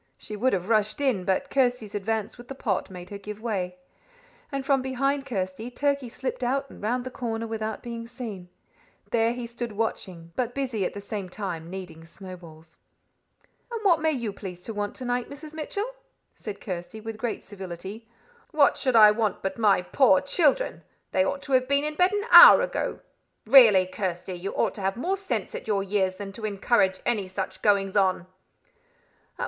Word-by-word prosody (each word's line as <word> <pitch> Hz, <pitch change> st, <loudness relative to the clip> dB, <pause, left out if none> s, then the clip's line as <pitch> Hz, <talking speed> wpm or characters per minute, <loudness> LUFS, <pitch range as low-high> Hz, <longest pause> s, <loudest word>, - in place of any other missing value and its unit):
She 210 Hz, -, -7 dB
would 250 Hz, +5 st, +1 dB
have 185 Hz, -1 st, -1 dB
rushed 215 Hz, 0 st, +2 dB
in, 250 Hz, -10 st, +1 dB
but 190 Hz, +9 st, 0 dB
Kirsty's 245 Hz, -5 st, +1 dB
advance 210 Hz, +1 st, -2 dB
with 240 Hz, 0 st, -13 dB
the 270 Hz, -, -7 dB
pot 205 Hz, -8 st, -2 dB
made 180 Hz, 0 st, -10 dB
her 200 Hz, -, -6 dB
give 210 Hz, +1 st, -8 dB
way, 195 Hz, -6 st, -3 dB, 0.8 s
and 275 Hz, -1 st, -3 dB
from 275 Hz, -1 st, +3 dB
behind 275 Hz, +2 st, -1 dB
Kirsty 195 Hz, +1 st, -3 dB
Turkey 280 Hz, 0 st, -1 dB
slipped 255 Hz, +1 st, -4 dB
out 270 Hz, +3 st, 0 dB
and -, -, -13 dB
round 245 Hz, +4 st, -1 dB
the 255 Hz, -, -6 dB
corner 230 Hz, -3 st, -3 dB
without 220 Hz, -1 st, -4 dB
being 230 Hz, -1 st, -6 dB
seen. 225 Hz, -7 st, -8 dB, 0.6 s
There 230 Hz, 0 st, +3 dB
he 240 Hz, 0 st, -5 dB
stood 235 Hz, -1 st, -6 dB
watching, 185 Hz, -6 st, -4 dB
but 245 Hz, -1 st, -2 dB
busy 250 Hz, -8 st, -1 dB
at -, -, -4 dB
the 200 Hz, -, -6 dB
same 200 Hz, -2 st, -5 dB
time 175 Hz, -4 st, -5 dB
kneading 180 Hz, -3 st, -8 dB
snowballs. 165 Hz, -3 st, -12 dB, 0.9 s
"And 465 Hz, -, -3 dB
what 340 Hz, -5 st, +4 dB
may 320 Hz, -, +2 dB
you 235 Hz, -9 st, -2 dB
please 180 Hz, -3 st, -8 dB
to 225 Hz, -, -5 dB
want 205 Hz, 0 st, -3 dB
to 255 Hz, -, -7 dB
night, 245 Hz, 0 st, -1 dB
Mrs. 295 Hz, +2 st, -10 dB
Mitchell?" 320 Hz, +7 st, -3 dB, 0.5 s
said 205 Hz, -2 st, -8 dB
Kirsty, 185 Hz, +3 st, -6 dB
with 220 Hz, 0 st, -7 dB
great 235 Hz, -1 st, -3 dB
civility. 195 Hz, +3 st, -8 dB, 0.4 s
"What 295 Hz, -2 st, +4 dB
should 255 Hz, -3 st, 0 dB
I 215 Hz, -2 st, +9 dB
want 210 Hz, -2 st, -1 dB
but 190 Hz, +3 st, -3 dB
my 205 Hz, -4 st, +4 dB
poor 190 Hz, -1 st, +4 dB
children? 315 Hz, -, +1 dB, 0.3 s
They 185 Hz, -, +3 dB
ought 280 Hz, +8 st, -2 dB
to 275 Hz, -, -8 dB
have 255 Hz, -1 st, +3 dB
been 280 Hz, +1 st, +2 dB
in 300 Hz, 0 st, -2 dB
bed 360 Hz, +4 st, +3 dB
an 410 Hz, +1 st, -1 dB
hour -, -, +11 dB
ago. -, -, -3 dB, 0.4 s
Really, 220 Hz, -6 st, +8 dB
Kirsty, 185 Hz, -1 st, -4 dB
you 180 Hz, +2 st, -5 dB
ought -, -, +1 dB
to 205 Hz, -, -8 dB
have 195 Hz, +2 st, -1 dB
more 360 Hz, +10 st, 0 dB
sense 390 Hz, 0 st, -3 dB
at -, -, -6 dB
your 200 Hz, -2 st, +1 dB
years 190 Hz, -1 st, 0 dB
than 200 Hz, 0 st, -7 dB
to 215 Hz, +2 st, -7 dB
encourage 195 Hz, -1 st, +1 dB
any 210 Hz, -5 st, 0 dB
such 190 Hz, +1 st, -5 dB
goings 200 Hz, -2 st, +2 dB
on." 185 Hz, -3 st, +2 dB
220 Hz, 190 wpm, -26 LUFS, 190-255 Hz, 0.9 s, hour